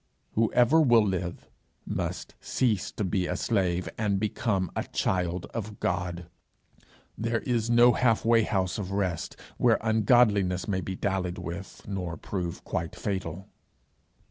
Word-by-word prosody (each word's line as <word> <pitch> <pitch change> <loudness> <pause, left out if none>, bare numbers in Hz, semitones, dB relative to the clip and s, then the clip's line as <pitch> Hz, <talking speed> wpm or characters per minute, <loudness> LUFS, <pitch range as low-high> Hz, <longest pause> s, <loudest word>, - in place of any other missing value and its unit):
Whoever 120 +7 +4
will 120 -7 +5
live 90 -3 -3 0.4
must - - -4
cease 110 -7 0
to 105 - -3
be 95 -1 0
a - - -1
slave 90 -5 0
and 100 -3 +1
become 105 -3 -1
a - - -1
child 90 -1 -1
of 105 -2 -5
God. 90 -1 -2 0.9
There 115 0 -1
is 120 -2 0
no 120 +1 +7
half 115 -3 +2
way 115 0 +5
house 95 -1 -1
of 95 -3 -4
rest, 95 -4 -2 0.2
where - - +4
ungodliness 105 -4 +3
may 95 -3 0
be 95 - -4
dallied 95 -2 -1
with, 85 +4 -7
nor 90 -4 -4
prove 90 -4 -4
quite 85 +3 -3
fatal. 95 -2 -4
100 Hz, 140 wpm, -28 LUFS, 90-115 Hz, 0.9 s, no